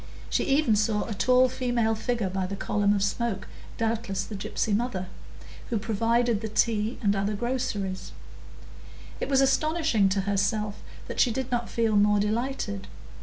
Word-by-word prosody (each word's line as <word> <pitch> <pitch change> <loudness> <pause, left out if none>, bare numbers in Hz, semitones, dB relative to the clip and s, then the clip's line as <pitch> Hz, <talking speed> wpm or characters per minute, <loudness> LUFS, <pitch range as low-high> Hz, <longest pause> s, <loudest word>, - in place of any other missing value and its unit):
She - - +1
even 275 -5 +3
saw 210 0 +1
a 225 - -4
tall 255 +6 +4
female 245 -3 0
figure 225 -3 -1
by 190 -1 -1
the 200 - -4
column 205 +1 +1
of 195 - 0
smoke, 205 -1 -1 0.3
doubtless 225 -4 -1
the 215 - -8
gypsy 205 +1 -1
mother, 210 -5 -1 0.6
who 235 - 0
provided 230 +1 +1
the 220 - -4
tea 215 +1 +1
and 200 -1 +3
other 200 +2 0
groceries; 225 -5 -3 1.1
it - - -3
was 270 -1 +4
astonishing 270 - +2
to 195 +1 +1
herself 205 +1 -1 0.3
that - - -5
she 250 - +5
did 255 +2 -3
not 240 -1 -1
feel 225 -2 +1
more 205 0 +4
delighted. 215 -1 -2
220 Hz, 160 wpm, -27 LUFS, 200-240 Hz, 1.1 s, she